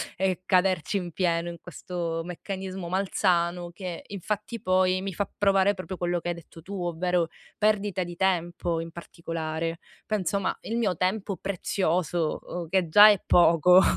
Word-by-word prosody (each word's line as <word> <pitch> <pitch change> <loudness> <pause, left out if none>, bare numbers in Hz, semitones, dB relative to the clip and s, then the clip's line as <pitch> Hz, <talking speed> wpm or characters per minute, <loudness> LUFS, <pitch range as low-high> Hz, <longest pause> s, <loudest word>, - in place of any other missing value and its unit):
e 185 -1 0
caderci 185 -2 +2
in 180 -3 -4
pieno 170 0 0
in 170 - -7
questo 170 -2 -4
meccanismo 190 +1 -6
malsano, 175 -2 0
che 180 -2 -6
infatti 210 +3 -4
poi, 185 0 +2
mi 195 0 -3
fa 200 +3 -2
provare 195 0 +4
proprio 185 -1 -6
quello 175 0 0
che 170 - -7
hai 175 - -1
detto 165 0 -13
tu, 200 +5 -8
ovvero, 175 0 0 0.3
perdita 205 -3 +1
di 175 0 -7
tempo 175 -2 0
in 165 0 -6
particolare. 165 -1 -4 0.3
Penso, 200 -2 0
ma 195 - -1
il 230 +2 -3
mio 205 -6 +1
tempo 190 +3 -1
prezioso, 175 -4 -1 0.3
che 185 -1 +2
già 205 +6 +9
è 205 -2 +4
poco, 175 +1 +6
180 Hz, 155 wpm, -27 LUFS, 170-195 Hz, 0.3 s, già